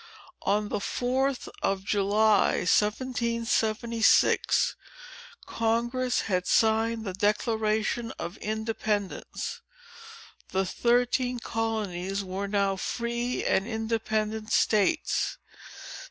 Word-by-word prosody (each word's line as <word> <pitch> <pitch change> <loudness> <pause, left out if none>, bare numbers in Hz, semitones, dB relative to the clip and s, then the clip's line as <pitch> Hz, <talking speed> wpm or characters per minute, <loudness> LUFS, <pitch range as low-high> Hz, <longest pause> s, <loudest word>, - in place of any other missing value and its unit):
On 205 +1 0
the 210 - -1
4th 260 +5 -1
of 195 -1 0
July, 205 0 +3
1776, 230 +1 +2 0.7
Congress 240 +3 0
had 180 -3 -1
signed 225 0 +2
the 190 - -3
Declaration 215 +3 0
of 170 +5 -6
Independence. 220 - -3 0.9
The 190 0 0
thirteen 245 +4 +1
colonies 205 -5 -2
were 190 +1 -4
now 200 -1 +1
free 235 +4 -2
and 195 - +1
independent 220 -1 -2
states. 220 +10 +2
220 Hz, 80 wpm, -27 LUFS, 205-235 Hz, 0.9 s, July